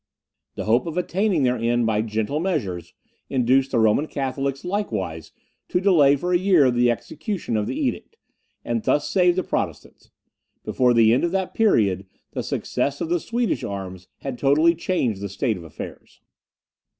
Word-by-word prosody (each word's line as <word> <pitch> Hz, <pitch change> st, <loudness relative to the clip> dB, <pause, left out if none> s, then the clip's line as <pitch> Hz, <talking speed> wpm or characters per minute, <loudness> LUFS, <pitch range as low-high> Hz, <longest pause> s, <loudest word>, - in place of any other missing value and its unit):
The -, -, -4 dB
hope 120 Hz, +8 st, +2 dB
of 165 Hz, +1 st, -5 dB
attaining 180 Hz, -2 st, +1 dB
their 125 Hz, 0 st, +2 dB
end 120 Hz, +1 st, +1 dB
by 110 Hz, -1 st, +1 dB
gentle 110 Hz, +6 st, -2 dB
measures, 100 Hz, -, -3 dB, 0.3 s
induced 130 Hz, +1 st, +2 dB
the 125 Hz, -, 0 dB
Roman 110 Hz, +7 st, +3 dB
Catholics 135 Hz, +1 st, -3 dB
likewise 95 Hz, -, -3 dB, 0.4 s
to 180 Hz, -, 0 dB
delay 160 Hz, -8 st, +5 dB
for 180 Hz, +6 st, -2 dB
a 175 Hz, -, +4 dB
year 175 Hz, -9 st, +4 dB
the 120 Hz, 0 st, +3 dB
execution 155 Hz, -, -3 dB
of 105 Hz, -1 st, 0 dB
the -, -, -3 dB
edict, 300 Hz, -, -3 dB, 0.5 s
and 230 Hz, -, -1 dB
this 145 Hz, -8 st, +1 dB
saved 180 Hz, -1 st, +3 dB
the 185 Hz, -, +1 dB
Protestants; -, -, -4 dB, 0.6 s
before 125 Hz, -1 st, +2 dB
the 115 Hz, -1 st, +5 dB
end 125 Hz, -, +2 dB
of 170 Hz, -, +1 dB
that 190 Hz, -1 st, -1 dB
period, 100 Hz, -, +2 dB, 0.2 s
the -, -, -3 dB
success 140 Hz, 0 st, -2 dB
of 160 Hz, -, -3 dB
the 175 Hz, 0 st, +1 dB
Swedish 235 Hz, +7 st, -1 dB
arms 95 Hz, -2 st, -6 dB
had 135 Hz, -3 st, -5 dB
totally 155 Hz, +5 st, +4 dB
changed 130 Hz, -, -1 dB
the 100 Hz, -, -4 dB
state 110 Hz, +4 st, -1 dB
of 90 Hz, -, -9 dB
affairs. 80 Hz, -, -10 dB
135 Hz, 170 wpm, -23 LUFS, 110-175 Hz, 0.6 s, delay